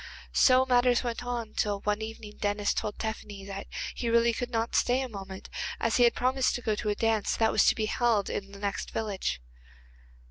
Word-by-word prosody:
So 260 0 +5
matters 245 -1 +3
went 240 0 -3
on 240 -3 -4
till 205 -1 -1
one 210 +1 0
evening 220 -1 -7
Denis 205 0 +1
told 210 - -3
Tephany 210 -3 -5
that 195 0 -6 0.3
he 235 - -2
really 235 0 +4
could 245 +2 -3
not 230 -1 -1
stay 250 +2 +3
a - - -3
moment, 195 -4 -8 0.3
as 230 - +1
he 245 - +6
had 235 - +3
promised 255 +1 +1
to 245 - -4
go 215 - +1
to 210 0 -2
a 205 - +1
dance 225 -2 +1
that 225 -1 +2
was 215 - +4
to - - +5
be 220 - 0
held 225 -3 +1
in 195 0 -4
the 200 - -10
next 200 0 -3
village. 200 - -2
220 Hz, 210 wpm, -29 LUFS, 205-240 Hz, 0.3 s, he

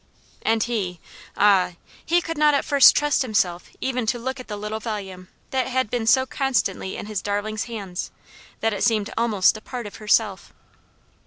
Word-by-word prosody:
And 225 0 +2
he 195 -8 -3 0.4
ah! 195 -3 +4 0.3
he 345 +2 +2
could 330 - -4
not 300 -1 +4
at 280 - 0
first 280 -2 +7
trust 295 -1 +2
himself 200 -8 0
even 250 -3 -1
to 240 +2 +1
look 260 +3 -4
at 255 - -9
the 210 - -5
little 210 +1 -4
volume 195 -5 -6 0.2
that 260 -1 0
had 260 -3 -1
been 235 -2 -1
so 260 +2 +5
constantly 240 -9 -1
in - - -6
his 210 -2 -3
darling's 205 +1 -2
hands, 200 -6 -5 0.5
that 225 0 +1
it 200 - -2
seemed 215 -3 +1
almost 220 -3 +3
a - - -12
part 245 0 -6
of 205 - -9
herself. 210 -2 0
220 Hz, 180 wpm, -23 LUFS, 205-255 Hz, 0.5 s, first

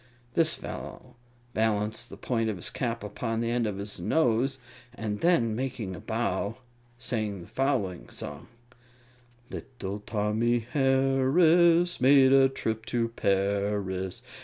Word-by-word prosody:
This 165 -2 +3
fellow 125 -1 -8 0.4
balanced 110 +1 0
the - - -10
point 115 -3 -1
of 110 - -2
his 90 - -3
cap 115 -4 -3
upon 115 +2 -3
the 115 0 -1
end 120 -2 +1
of 100 -2 -3
his 100 +1 -5
nose, 130 -3 +2 0.4
and 105 -2 -3
then, 120 -11 +3
making 120 -6 -3
a - - -8
bow, 110 -1 -2 0.4
sang 110 -6 -3
the - - -10
following 125 -10 -1
song: 70 0 -8 1.0
Little 105 -6 -6
Tommy 110 +3 0
Harris 150 +6 +4
Made 135 0 +6
a 135 -1 +6
trip 110 -4 -3
to 120 -2 0
Paris. 100 -2 -1
115 Hz, 130 wpm, -28 LUFS, 105-135 Hz, 1.0 s, Made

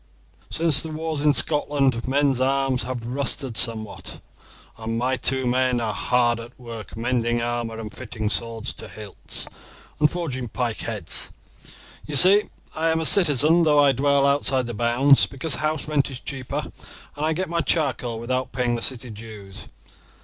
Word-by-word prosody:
Since 160 -4 +4
the 160 - -2
wars 155 -1 -3
in 150 -1 +3
Scotland 140 -5 +1
men's 135 -1 +1
arms 135 -1 +1
have 125 -2 -5
rusted 135 0 -2
somewhat, 110 -2 -2 0.6
and 115 0 -4
my 130 +2 0
two 130 0 +2
men 125 0 +1
are 110 -2 -2
hard 120 0 +1
at 120 +2 -12
work 115 -3 -9
mending 120 0 0
armour 120 -1 -3
and 110 -1 -7
fitting 110 -4 -5
swords 115 +2 -2
to - - -7
hilts, 105 -3 -7 0.5
and 150 0 +4
forging 140 -8 -4
pike 115 0 -3
heads. - - -4 0.8
You 150 - -4
see 195 +8 +8 0.3
I 160 +1 0
am 160 0 +1
a 160 - -2
citizen 160 -2 +5
though 155 -3 +3
I 145 -1 +5
dwell 140 +2 +2
outside 140 -2 +1
the 120 - -5
bounds, 120 +5 +4
because 140 +2 -2
house 155 +2 -2
rent 150 -3 +1
is 130 -2 -7
cheaper 130 -2 -5 0.4
and 145 - -5
I 160 +1 +1
get 185 +4 -2
my 170 0 -1
charcoal 125 -9 -1
without 130 +1 -3
paying 125 -2 -1
the 120 - -3
city 125 -2 +1
dues. 105 -3 -10
130 Hz, 165 wpm, -23 LUFS, 120-145 Hz, 0.8 s, see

